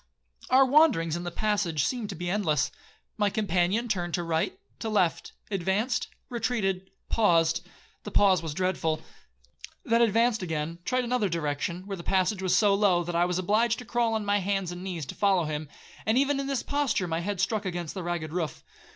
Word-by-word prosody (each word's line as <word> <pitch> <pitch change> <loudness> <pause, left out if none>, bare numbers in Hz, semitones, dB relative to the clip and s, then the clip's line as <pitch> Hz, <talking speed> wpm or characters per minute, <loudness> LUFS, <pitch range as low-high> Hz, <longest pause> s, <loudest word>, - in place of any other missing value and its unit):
'Our 265 +1 +6
wanderings 260 - +4
in 175 +1 -5
the - - -2
passage 180 -6 0
seemed 240 -5 -2
to 195 - -5
be 175 +1 -5
endless. 155 -7 +1 0.5
My 205 -2 +2
companion 200 +2 +1
turned 175 -6 -1
to 175 - -2
right, 165 - -1 0.2
to 225 - -3
left,—advanced, 200 +3 -1 0.2
retreated, 200 -7 -1 0.2
paused,—(the 175 -1 0
pause 195 -4 +4
was 160 -3 -5
dreadful)!—Then 160 - -3
advanced 230 0 +3
again, 165 -1 -3
tried 255 +4 +1
another 240 -4 0
direction, 170 +2 -2
where 195 -1 -5
the - - -7
passage 190 +2 +1
was 185 -1 +2
so 205 -2 +4
low 195 -4 +3
that 170 0 -4
I 170 +1 +4
was 180 0 -1
obliged 215 +5 +2
to 250 - -8
crawl 235 -1 +1
on 215 -1 -2
my 205 0 +2
hands 195 -2 -1
and 175 +1 -7
knees 175 -6 -4
to - - -7
follow 195 -4 +2
him, 150 -1 -4 0.3
and 220 +3 +2
even 280 +1 +2
in 275 - -2
this 275 -2 -1
posture 285 -10 0
my 165 0 -1
head 195 +2 -3
struck 205 +2 0
against 175 -3 -4
the 190 - -5
ragged 170 -3 -3
roof. 165 -4 -3
190 Hz, 185 wpm, -27 LUFS, 170-220 Hz, 0.5 s, Our